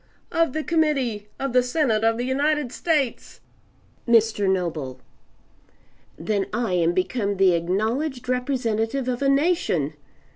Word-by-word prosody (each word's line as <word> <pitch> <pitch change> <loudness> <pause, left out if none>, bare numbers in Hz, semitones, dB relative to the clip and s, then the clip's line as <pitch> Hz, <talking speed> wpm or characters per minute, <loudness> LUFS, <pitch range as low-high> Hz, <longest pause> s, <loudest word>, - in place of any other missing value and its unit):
"Of 330 -5 +1
the 315 - -2
Committee! 275 -11 0
Of 275 -2 -2
the 250 - +5
Senate 250 -4 0
of 225 0 +2
the 245 - -2
United 285 0 0
States!" 295 -7 -1 0.7
Mr. 225 -4 +3
Noble 160 -9 -2 1.2
"Then 195 +3 -1
I 225 -3 -1
am 170 -1 +2
become 200 +2 -1
the 190 -2 +5
acknowledged 225 - -1
representative 250 -1 -1
of 250 0 -2
a 275 - +2
nation. 275 - +1
235 Hz, 125 wpm, -23 LUFS, 200-275 Hz, 1.2 s, the